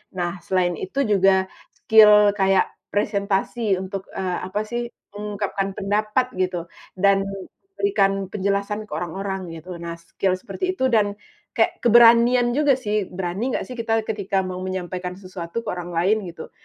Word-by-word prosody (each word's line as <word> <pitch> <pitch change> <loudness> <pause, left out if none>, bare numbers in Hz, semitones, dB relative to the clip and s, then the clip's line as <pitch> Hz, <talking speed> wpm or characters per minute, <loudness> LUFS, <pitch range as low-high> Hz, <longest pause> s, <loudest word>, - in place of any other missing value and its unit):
Nah, 175 0 -3
selain 180 -2 +1
itu 190 +9 -4
juga, 190 -1 +3 0.3
skill 210 -1 +6
kayak 195 0 +4 0.3
presentasi 200 +1 0
untuk, 190 +1 -6
eee, 185 -2 -2
apa 190 +3 -2
sih, 240 +2 -4 0.3
mengungkapkan 200 -1 -3
pendapat 215 +5 0
gitu, 180 -2 -2 0.3
dan 195 +1 +3 0.5
berikan 395 - +2 0.2
penjelasan 200 +1 -2
ke - - -28
orang-orang 190 +3 -4
gitu. 165 +2 -8
Nah, 170 0 -6
skill 185 +3 -1
seperti 370 - -3
itu 260 - +3
dan 210 -4 +1 0.4
kek - - +1
keberanian 240 +1 +6
juga 285 +1 +3
sih, 210 -6 -2
berani 190 +7 -3
nggak - - -1
sih, 255 - -7
ketika 225 -1 0
kita 200 -2 -2
mau 185 -1 -5
menyampaikan 185 -1 -4
sesuatu 185 +2 -6
ke - - -5
orang 175 -1 -5
lain 190 +6 +3
gitu. 165 -2 -9
195 Hz, 150 wpm, -23 LUFS, 185-215 Hz, 0.5 s, skill